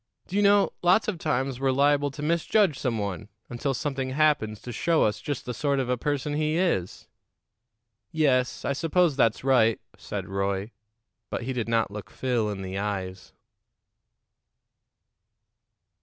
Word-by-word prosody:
Do 185 - -7
you 205 - +3
know, 200 0 +4
lots 180 +5 +4
of 195 -6 -2
times 135 -4 -1
we're 135 0 +1
liable 145 +1 +3
to 145 +2 -8
misjudge 170 +1 +2
some 120 -4 -1
one 100 0 -4 0.2
until 130 +3 -2
something 135 -1 -2
happens 130 -7 +1
to 125 - -7
show 165 +7 +2
us 105 - 0
just 145 -4 -4
the 125 - -4
sort 140 +3 0
of 130 -2 -2
a 125 - +2
person 145 +3 -2
he 155 +1 0
is." 165 - -1 1.0
"Yes; 130 -5 +1
I 140 - +1
suppose 165 +1 +2
that's 115 -4 +2
right," 125 -4 +3 0.2
said - - -5
Roy. 100 +2 -2 0.6
But - - -3
he 130 +2 -3
did 120 -2 -3
not 115 -3 +1
look 105 0 -8
Phil 120 -5 -1
in 100 -2 -5
the 95 +1 -4
eyes. 95 -3 -4
130 Hz, 155 wpm, -26 LUFS, 110-150 Hz, 1.0 s, know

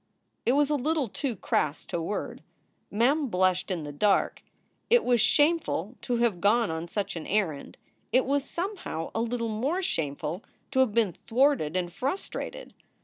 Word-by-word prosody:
It 245 - +5
was 290 +1 +3
a - - +3
little 295 0 0
too 250 +3 -3
crass 155 -4 -1
to 170 - -3
word. 185 +6 -4 0.5
Mem 270 +8 +2
blushed 185 -3 +1
in 175 -4 -2
the 145 - -6
dark. 195 +7 +2 0.5
It 480 0 +5
was 245 -2 +3
shameful 290 - +2
to 245 - -1
have 230 -7 +1
gone 220 0 +3
on 160 +1 -4
such 200 +2 -3
an 165 - -6
errand. 180 -9 -1 0.3
It 255 - +4
was 280 +1 +1
somehow 350 - -4
a 225 - 0
little 230 0 -1
more 270 - -1
shameful 155 - -2 0.3
to 260 - +1
have 255 -6 +3
been 220 -6 +3
thwarted 240 - +2
and 175 -1 -2
frustrated. 370 - -4
230 Hz, 165 wpm, -28 LUFS, 180-275 Hz, 0.5 s, It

